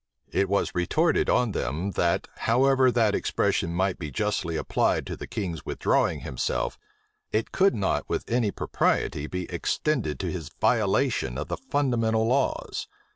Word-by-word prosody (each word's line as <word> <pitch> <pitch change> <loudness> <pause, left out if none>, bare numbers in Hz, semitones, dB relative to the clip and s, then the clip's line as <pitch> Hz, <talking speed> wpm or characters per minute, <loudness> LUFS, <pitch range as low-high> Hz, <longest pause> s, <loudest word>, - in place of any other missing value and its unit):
It 100 - +1
was 100 - +1
retorted 155 - +2
on 125 -3 +3
them, 85 +5 -2
that, 85 -2 +1 0.2
however 130 +2 +4
that 115 -4 +2
expression 85 - 0
might 95 +2 0
be 75 -4 -4
justly 80 +4 -1
applied - - +1
to - - -5
the - - -8
king's 90 -6 -4
withdrawing - - +1
himself, 65 - -2 0.5
it 110 +1 -1
could 195 +1 +3
not 100 -3 -1
with - - -1
any 115 -2 +1
propriety 75 -5 0
be 90 +2 -3
extended 120 - -1
to - - -2
his 80 -4 -5
violation 65 -1 +1
of 75 - -4
the - - -2
fundamental 120 - +1
laws. 130 +4 0
100 Hz, 150 wpm, -26 LUFS, 85-125 Hz, 0.5 s, however